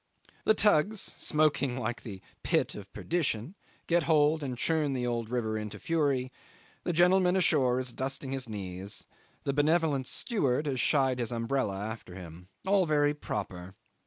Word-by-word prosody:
The 220 - +5
tugs, 205 +1 +3
smoking 150 -7 +1
like 120 -1 -3
the 100 -5 -9 0.2
pit - - +1
of 100 -1 -10
perdition, 155 - -2 0.3
get 170 0 +3
hold 155 0 +4
and 130 -4 -4
churn 155 0 +1
the 125 -2 -1
old 120 -2 -2
river 110 -3 -1
into 105 -1 -6
fury; 140 -6 0 0.5
the - - 0
gentleman 180 +2 +4
ashore 135 -9 +3
is 125 -2 -2
dusting 135 +1 -3
his 130 -3 -2
knees 95 -1 -6 0.4
the 140 - -1
benevolent 150 -2 +2
steward 150 - 0
has 135 -3 -1
shied 135 -3 +2
his 120 0 -1
umbrella 115 -4 -1
after 105 -3 -6
him. 90 0 -10 0.2
All 190 -2 +3
very 145 -1 +3
proper. 95 -9 -5
135 Hz, 155 wpm, -30 LUFS, 115-155 Hz, 0.5 s, The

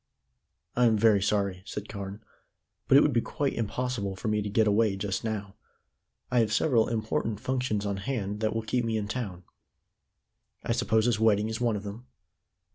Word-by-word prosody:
"I 125 - +4
am 110 -2 +4
very 105 -2 +4
sorry," 100 -2 0
said 105 +1 -6
Carne, 100 0 -7 0.6
"but 135 - +7
it - - +8
would 150 - +3
be 120 - +3
quite 140 +3 -2
impossible 115 -3 -2
for 100 - -3
me 105 0 +1
to 105 - -3
get 110 +2 +3
away 105 -1 +3
just 100 0 -3
now. 105 -3 -3 0.8
I 125 - +3
have 110 -2 +2
several 115 -1 +3
important 110 -1 -1
functions 125 -6 -1
on 100 -1 -1
hand 105 -1 -3
that 110 0 0
will 115 - -1
keep 120 +2 0
me 115 -1 0
in 105 -1 -2
town." 105 -6 -4 1.2
"I - - -2
suppose 115 -2 +2
this 120 -3 +2
wedding 110 -1 +3
is 110 +2 -4
one 120 -3 +2
of 100 - -4
them?" 105 +5 -8
110 Hz, 190 wpm, -28 LUFS, 100-115 Hz, 1.2 s, it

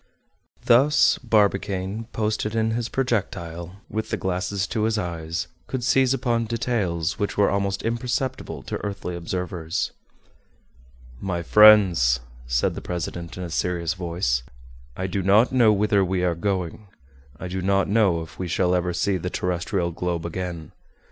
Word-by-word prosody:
Thus 135 +6 +5
Barbicane, 100 -2 0
posted 110 0 -1
in 110 0 +1
his 115 0 -2
projectile, 90 -8 -2
with 110 0 -4
the - - -1
glasses 95 +2 -1
to 110 +1 -1
his 110 0 +1
eyes, 85 -4 -3 0.2
could 130 -2 -3
seize 130 0 +3
upon 120 -3 0
details 105 -8 -1
which 100 - -2
were 100 - +4
almost 100 0 -1
imperceptible 125 +3 -2
to - - -5
earthly 100 -3 -4
observers. 85 -1 -3 1.3
"My 90 -3 -2
friends," 95 - +6 0.3
said - - +1
the - - -6
president, 85 -1 -5
in 90 - -4
a 85 - -6
serious 85 -1 -1
voice, 85 -9 -1 0.6
"I 95 - -2
do 95 +1 -2
not 100 +6 +4
know 120 -4 +5
whither 105 -1 +3
we 95 0 -1
are 90 -1 +2
going; 95 +2 -3 0.5
I 95 - -5
do 95 +1 -3
not 100 +1 +2
know 100 -6 +2
if 80 - -14
we 90 - -2
shall 90 +1 +1
ever 90 0 0
see 95 +2 0
the 90 +1 -4
terrestrial 90 0 -1
globe 85 -1 -3
again. 85 -2 -5
95 Hz, 150 wpm, -24 LUFS, 85-110 Hz, 1.3 s, friends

